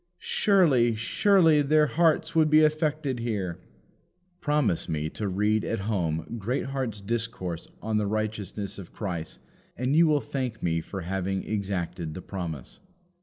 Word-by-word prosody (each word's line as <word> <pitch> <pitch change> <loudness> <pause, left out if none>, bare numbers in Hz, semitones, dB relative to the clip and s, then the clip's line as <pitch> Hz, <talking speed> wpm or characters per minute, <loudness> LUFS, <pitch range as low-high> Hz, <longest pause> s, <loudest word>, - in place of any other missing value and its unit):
Surely, 185 - +3
surely 160 - +4
their 150 +2 +4
hearts 160 +1 +2
would 160 -1 +4
be 155 +1 +6
affected 155 -4 +1
here!" 100 -7 -2 0.8
Promise 145 - +1
me 80 -1 -2
to 105 - -3
read 105 +3 +1
at 115 - -2
home 90 -1 -2
Greatheart's 125 0 -2
discourse 110 -6 -3 0.2
on 110 -1 0
the 105 -1 +1
Righteousness 105 -2 -3
of 90 - -10
Christ, 85 -6 -5 0.4
and 130 +4 0
you 165 +1 +6
will 150 -1 +3
thank 130 -6 -4
me 85 -1 +1
for 95 +3 -6
having 95 +2 -2
exacted 90 -6 -3
the 95 - -6
promise. 85 -8 -6
110 Hz, 140 wpm, -27 LUFS, 95-150 Hz, 0.8 s, be